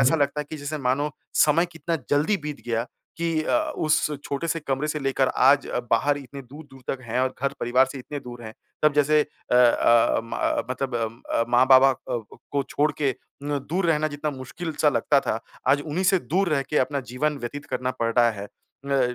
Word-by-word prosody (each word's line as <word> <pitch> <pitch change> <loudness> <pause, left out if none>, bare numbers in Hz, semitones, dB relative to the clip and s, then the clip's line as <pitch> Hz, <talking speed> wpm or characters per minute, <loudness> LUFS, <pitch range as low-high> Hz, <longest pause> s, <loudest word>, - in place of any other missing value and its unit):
ऐसा 135 +5 +4
लगता 145 0 0
है - - -4
कि 155 - -5
जैसे 150 +1 -5
मानो 145 +4 +1 0.4
समय 165 +4 +3
कितना 165 +1 -2
जल्दी 150 +9 +3
बीत 150 -1 -5
गया 115 0 -1 0.3
कि 165 -2 0
अ, - - +2 0.2
उस 155 -1 +1
छोटे 145 +4 -3
से 165 0 -1
कमरे 140 +1 -2
से 150 - -1
लेकर 135 -1 +1
आज 140 +2 +5
अ, - - -1
बाहर 145 +5 +3
इतने 140 0 -9
दूर-दूर 135 +1 -13 0.2
तक - - -20
हैं 115 +1 -2
और 130 0 0
घर-परिवार 130 -2 +2
से 140 - -7
इतने 145 +3 -6
दूर 120 -2 -10
हैं। 110 0 -9 0.3
तब 150 -1 +5
जैसे 150 +1 +4
अ 150 - -6
अ, 120 -1 +4
म 115 - -7
अ, - - 0
मतलब 130 0 -3 0.4
अ, 115 - +2
माँ-बाबा 130 +2 +6
अ, - - -1
को 120 -4 -5 0.2
को 140 -1 +1
छोड़ 150 +1 +2
के 135 -3 +1 0.3
न 145 0 -1
दूर 180 +1 +1
रहना 155 -2 +2
जितना 145 +1 -3
मुश्किल-सा 150 +4 -2
लगता - - +2
था। - - -2 0.3
आज 145 - +4
उन्हीं 165 +5 -2
से 190 0 +4
दूर 185 +3 0
रह 140 -3 +2
के 150 - +2
अपना 140 +2 0
जीवन 150 +3 -1
व्यतीत 140 +4 -6
करना 130 0 -2
पड़ 115 0 +1
रहा 120 -1 +6
है। 100 -2 -7 0.4
अ, 135 -3 +1
140 Hz, 210 wpm, -24 LUFS, 130-150 Hz, 0.4 s, माँ-बाबा